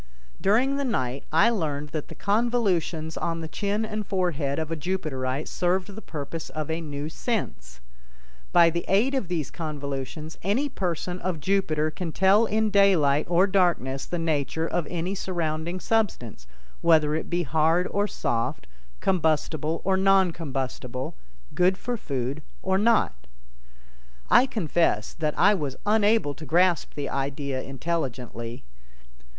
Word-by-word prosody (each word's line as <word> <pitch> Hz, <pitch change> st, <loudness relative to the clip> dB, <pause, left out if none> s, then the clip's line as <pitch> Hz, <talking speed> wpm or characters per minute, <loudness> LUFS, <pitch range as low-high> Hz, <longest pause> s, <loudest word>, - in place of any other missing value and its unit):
During 250 Hz, +8 st, +3 dB
the 280 Hz, -, -1 dB
night 135 Hz, -, -2 dB
I 165 Hz, +9 st, +5 dB
learned 150 Hz, -8 st, -2 dB
that 150 Hz, 0 st, -4 dB
the -, -, -10 dB
convolutions 200 Hz, -8 st, 0 dB
on 165 Hz, -1 st, -2 dB
the 160 Hz, -, -4 dB
chin 205 Hz, +5 st, -1 dB
and 215 Hz, 0 st, -3 dB
forehead 170 Hz, -8 st, -1 dB
of 160 Hz, 0 st, -3 dB
a -, -, 0 dB
Jupiterite 150 Hz, -5 st, -2 dB
served 185 Hz, +2 st, 0 dB
the 220 Hz, -, -8 dB
purpose 155 Hz, -1 st, -6 dB
of 155 Hz, 0 st, -4 dB
a 165 Hz, +1 st, -2 dB
new 145 Hz, -2 st, -5 dB
sense. 155 Hz, -, -4 dB, 0.7 s
By 170 Hz, -1 st, +6 dB
the 170 Hz, +1 st, -2 dB
aid 220 Hz, +8 st, +3 dB
of 265 Hz, -9 st, -1 dB
these 165 Hz, -5 st, -2 dB
convolutions 150 Hz, 0 st, -5 dB
any 235 Hz, +10 st, +1 dB
person 180 Hz, -, -3 dB
of 180 Hz, -2 st, -2 dB
Jupiter 155 Hz, -3 st, +1 dB
can 170 Hz, 0 st, -4 dB
tell 195 Hz, +6 st, +4 dB
in 215 Hz, +1 st, +1 dB
daylight 170 Hz, -8 st, +4 dB
or 175 Hz, +2 st, +5 dB
darkness 175 Hz, -9 st, +1 dB
the 175 Hz, -, -2 dB
nature 160 Hz, -1 st, 0 dB
of 165 Hz, -1 st, -1 dB
any 175 Hz, +2 st, -2 dB
surrounding 170 Hz, -2 st, -2 dB
substance, 170 Hz, -, -1 dB, 0.3 s
whether 155 Hz, -3 st, +4 dB
it 160 Hz, -, -2 dB
be 175 Hz, 0 st, 0 dB
hard 160 Hz, +5 st, +2 dB
or 205 Hz, +1 st, +1 dB
soft, 115 Hz, -, -2 dB, 0.4 s
combustible 160 Hz, -2 st, +1 dB
or 190 Hz, 0 st, +2 dB
non 190 Hz, -1 st, +4 dB
combustible, 130 Hz, -4 st, -4 dB, 0.4 s
good 185 Hz, +1 st, +3 dB
for 245 Hz, +4 st, -3 dB
food 135 Hz, -, -3 dB, 0.2 s
or 190 Hz, 0 st, +2 dB
not. 225 Hz, -, +3 dB, 1.2 s
I 255 Hz, -, +7 dB
confess 165 Hz, -, 0 dB
that 155 Hz, -2 st, -2 dB
I 205 Hz, -, +6 dB
was 145 Hz, -9 st, -2 dB
unable 210 Hz, -6 st, +3 dB
to 155 Hz, -, -10 dB
grasp 175 Hz, -1 st, +2 dB
the 145 Hz, -2 st, -3 dB
idea 135 Hz, -1 st, -2 dB
intelligently. 130 Hz, -5 st, -4 dB
165 Hz, 145 wpm, -26 LUFS, 145-195 Hz, 1.2 s, I